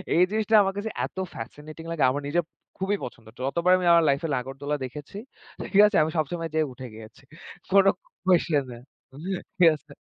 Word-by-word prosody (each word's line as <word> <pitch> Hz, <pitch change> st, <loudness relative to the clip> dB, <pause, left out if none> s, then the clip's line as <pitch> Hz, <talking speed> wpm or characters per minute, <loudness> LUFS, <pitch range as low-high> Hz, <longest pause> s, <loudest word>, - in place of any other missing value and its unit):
এই 175 Hz, -, +6 dB
জিনিসটা 220 Hz, 0 st, +1 dB
আমার 195 Hz, 0 st, 0 dB
কাছে 220 Hz, +2 st, -3 dB, 0.2 s
এত -, -, -12 dB, 0.2 s
ফ্যাসিনেটিং 150 Hz, +7 st, -9 dB
লাগে 160 Hz, -5 st, 0 dB
আমার 145 Hz, +3 st, -2 dB
নিজের 170 Hz, +3 st, +1 dB, 0.3 s
খুবই 195 Hz, +2 st, 0 dB
পছন্দ। 115 Hz, -2 st, -9 dB
যতবার 170 Hz, +7 st, +1 dB
আমি 180 Hz, -, -2 dB
আমার 170 Hz, -1 st, +6 dB
লাইফে 140 Hz, +4 st, +1 dB
নাগড়দোলা 135 Hz, +3 st, -3 dB
দেখেছি, 145 Hz, +9 st, -9 dB, 0.5 s
ঠিক 200 Hz, +1 st, +6 dB
আছে? 210 Hz, -, -3 dB
আমি 155 Hz, -, -2 dB
সবসময় 165 Hz, +2 st, -2 dB
যেয়ে 155 Hz, -2 st, +1 dB
উঠে 130 Hz, 0 st, -9 dB
গিয়েছি। 110 Hz, +3 st, -13 dB, 0.5 s
কোনো 195 Hz, 0 st, +6 dB, 0.4 s
কুয়েসশন 170 Hz, -6 st, +3 dB
নেই 120 Hz, -, -11 dB, 0.8 s
ঠিক 170 Hz, -2 st, +8 dB
আছে। 150 Hz, -, -17 dB
160 Hz, 175 wpm, -26 LUFS, 135-185 Hz, 0.8 s, ঠিক